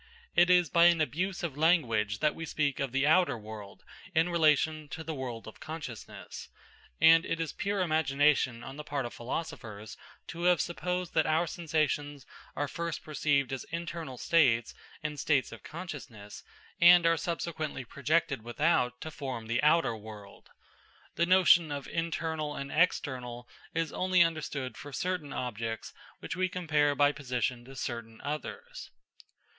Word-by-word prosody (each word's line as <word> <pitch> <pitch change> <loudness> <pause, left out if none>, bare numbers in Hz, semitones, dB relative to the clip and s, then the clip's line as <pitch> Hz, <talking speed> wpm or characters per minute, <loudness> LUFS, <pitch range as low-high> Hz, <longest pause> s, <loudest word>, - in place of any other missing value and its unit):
It 175 +1 +5
is 180 -1 +5
by 170 0 +6
an 170 -1 +6
abuse 175 +5 -1
of 160 -6 -3
language 120 - +2
that 150 - +3
we 165 - -7
speak 145 -2 -1
of 135 -3 -1
the 135 +2 +1
outer 165 -2 +4
world 105 -2 -10 0.3
in 165 +2 +3
relation 155 -2 +2
to 160 - -6
the 160 0 -4
world 125 -5 -6
of 110 - -11
consciousness, 150 -8 -8 0.5
and 165 0 +7
it 165 - -3
is 165 -2 -3
pure 200 0 -1
imagination 145 -6 +2
on 135 +1 -8
the 150 - -6
part 140 -3 -3
of 120 - -6
philosophers 115 -5 -6 0.3
to 170 +1 -4
have 180 -2 +5
supposed 180 +1 -2
that 160 - +2
our 160 +2 +2
sensations 150 -5 -2 0.3
are 145 +1 -1
first 170 +3 -4
perceived 145 -3 0
as 130 - -4
internal 170 -5 -5
states 125 -7 +3 0.3
and 150 -1 -4
states 140 -4 +1
of - - -10
consciousness, 140 - -9 0.4
and 175 0 +8
are 165 0 +5
subsequently 160 -4 -3
projected 140 +1 0
without 125 0 +1
to 160 - -6
form 130 -6 -5
the 115 +2 0
outer 150 -5 +3
world. 105 -2 -12 0.6
The 170 - +1
notion 175 -3 +5
of 140 -1 -4
internal 160 -2 -2
and 140 0 -5
external 125 -7 0 0.3
is 165 -1 -1
only 185 -1 +4
understood 150 -5 -3
for 145 - -9
certain 180 -3 -2
objects 115 -3 -4 0.3
which - - -4
we 185 0 0
compare 150 -5 +1
by 145 0 +4
position 125 -3 -2
to 135 +1 -12
certain 115 -3 -5
others. 320 - -6
150 Hz, 155 wpm, -30 LUFS, 130-165 Hz, 0.6 s, and